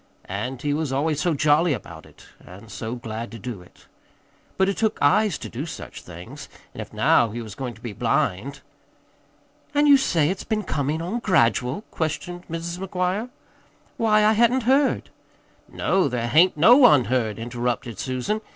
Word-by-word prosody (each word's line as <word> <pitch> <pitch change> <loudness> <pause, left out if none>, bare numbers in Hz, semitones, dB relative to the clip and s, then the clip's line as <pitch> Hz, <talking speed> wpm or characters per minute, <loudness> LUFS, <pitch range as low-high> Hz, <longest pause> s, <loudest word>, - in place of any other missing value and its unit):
And 120 +7 -5
he 145 -1 0
was 150 -2 -2
always 150 +2 0
so 175 -3 +1
jolly 150 +3 +3
about 85 - -9
it, - - -18 0.2
and 100 +5 -13
so 115 +1 -5
glad 115 -1 -6
to - - -7
do 115 -3 -7
it. 90 - -20 0.7
But 190 - +3
it 195 - 0
took 220 -1 0
eyes 180 +5 +3
to - - -7
do 140 +7 -6
such - - -8
things, 85 0 -11 0.2
and - - -7
if - - -9
now 115 - +3
he 115 +3 -6
was 110 -3 -7
going 125 -1 -6
to 115 - -18
be 115 -3 -6
blind 105 +7 -1 1.1
"An' 290 +1 +4
you 285 -1 +7
say 165 - +1
it's 190 - -5
been 215 -1 -2
comin' 155 -1 -2
on 205 +8 -3
gradual?" 130 - +1
questioned 175 +3 -4
Mrs. 170 +1 -5
McGuire. 190 +4 -2 0.7
"Why, 215 -2 +3
I 215 - +5
hadn't 235 +3 +3
heard 270 +4 +2 0.3
" - - -35
"No, 190 -4 +1
there 120 -2 -2
hain't 165 +5 +4
no 225 - +7
one 215 - +6
heard," 115 -4 -1
interrupted 120 -1 -3
Susan. 130 - -2
150 Hz, 180 wpm, -23 LUFS, 120-190 Hz, 1.1 s, you